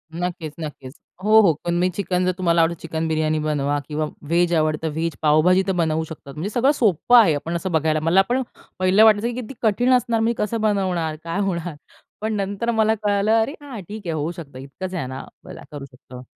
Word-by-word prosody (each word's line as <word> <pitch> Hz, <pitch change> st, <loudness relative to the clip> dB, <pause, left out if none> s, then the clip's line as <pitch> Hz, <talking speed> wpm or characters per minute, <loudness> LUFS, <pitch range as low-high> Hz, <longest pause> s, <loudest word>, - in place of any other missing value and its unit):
नक्कीच, 170 Hz, -3 st, -4 dB
नक्कीच. 140 Hz, -4 st, -7 dB, 0.3 s
हो, 215 Hz, +1 st, +6 dB
हो. 170 Hz, -6 st, +4 dB
पण 175 Hz, -, 0 dB
मी 180 Hz, +1 st, +2 dB
चिकन 180 Hz, -2 st, -1 dB
जर 185 Hz, -, +2 dB
तुम्हाला 170 Hz, -2 st, +2 dB
आवडतं 165 Hz, +1 st, +1 dB
चिकन 160 Hz, 0 st, -3 dB
बिर्याणी 155 Hz, 0 st, 0 dB
बनवा 145 Hz, -1 st, -1 dB
किंवा 155 Hz, 0 st, -2 dB, 0.2 s
व्हेज 175 Hz, +1 st, +2 dB
आवडतं 155 Hz, 0 st, 0 dB
व्हेज. 165 Hz, +1 st, -2 dB
पावभाजी 160 Hz, +5 st, +4 dB
तर -, -, +2 dB
बनवू 160 Hz, 0 st, 0 dB
शकतात. 150 Hz, -3 st, -10 dB
म्हणजे 170 Hz, +8 st, -4 dB
सगळं 250 Hz, +6 st, +2 dB
सोप्पं 240 Hz, -, +3 dB
आहे, 190 Hz, -9 st, +5 dB
आपण 165 Hz, +4 st, -4 dB
असं 180 Hz, +2 st, -3 dB
बघायला 155 Hz, -1 st, +1 dB
मला 180 Hz, +4 st, +4 dB
पण 260 Hz, +2 st, +1 dB, 0.4 s
पहिलं 185 Hz, +4 st, +4 dB
वाटायचं, 220 Hz, +1 st, +5 dB
की 240 Hz, -, -3 dB
किती 240 Hz, +4 st, -9 dB
कठीण 240 Hz, +3 st, +2 dB
असणार. 240 Hz, -2 st, +2 dB
मी 230 Hz, +1 st, +1 dB
कसं 215 Hz, +1 st, -2 dB
बनवणार? 185 Hz, -7 st, 0 dB
काय 170 Hz, +4 st, -3 dB
होणार? 175 Hz, -5 st, -2 dB, 0.5 s
पण 220 Hz, 0 st, -1 dB
नंतर 200 Hz, +4 st, -2 dB
मला 220 Hz, -1 st, +2 dB
कळालं, 205 Hz, +1 st, +1 dB
"अरे, 230 Hz, -, -1 dB
हां, 265 Hz, -7 st, -8 dB
ठीक 210 Hz, +4 st, -9 dB
आहे. 165 Hz, -, -2 dB
होऊ 155 Hz, +2 st, -2 dB
शकतं 150 Hz, -6 st, -10 dB
इतकंच 180 Hz, +8 st, -7 dB
आहे 150 Hz, -8 st, -3 dB
ना, 130 Hz, +1 st, -7 dB, 0.2 s
मग -, -, -9 dB
काय -, -, -11 dB
करू 145 Hz, -2 st, -7 dB
शकतो." 125 Hz, -1 st, -13 dB
175 Hz, 215 wpm, -22 LUFS, 155-210 Hz, 0.5 s, हो